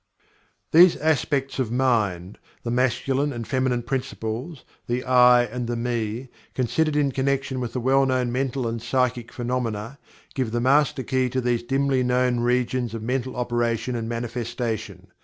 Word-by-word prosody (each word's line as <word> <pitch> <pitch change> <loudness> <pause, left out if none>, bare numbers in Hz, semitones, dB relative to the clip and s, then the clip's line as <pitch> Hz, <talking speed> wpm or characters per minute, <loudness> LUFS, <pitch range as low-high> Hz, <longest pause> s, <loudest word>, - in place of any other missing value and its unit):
These 175 +2 +7
aspects 140 -3 0
of 120 -4 -1
mind 105 -8 0 0.2
the 120 - -3
Masculine 130 +3 +1
and 120 -3 -6
Feminine 130 -2 0
Principles 125 +3 -4 0.2
the 120 +1 -1
"I" 125 -1 +6
and 120 +1 -4
the 120 - -2
"Me" 120 0 -2 0.3
considered 150 +5 0
in 145 -2 +2
connection 135 0 -1
with 120 -2 -4
the 125 - -1
well 135 +2 +3
known 130 -2 0
mental 130 -1 -1
and 115 0 -3
psychic 125 -1 -1
phenomena, 120 0 -3 0.3
give 130 -4 -1
the 120 - +1
master 135 +1 +2
key 130 -1 0
to 130 - -1
these 120 -1 0
dimly 135 +1 +1
known 125 0 +1
regions 125 -1 0
of 110 - -6
mental 130 +2 -2
operation 120 0 -1
and 115 -1 -3
manifestation. 115 -1 -4
125 Hz, 155 wpm, -24 LUFS, 120-130 Hz, 0.3 s, These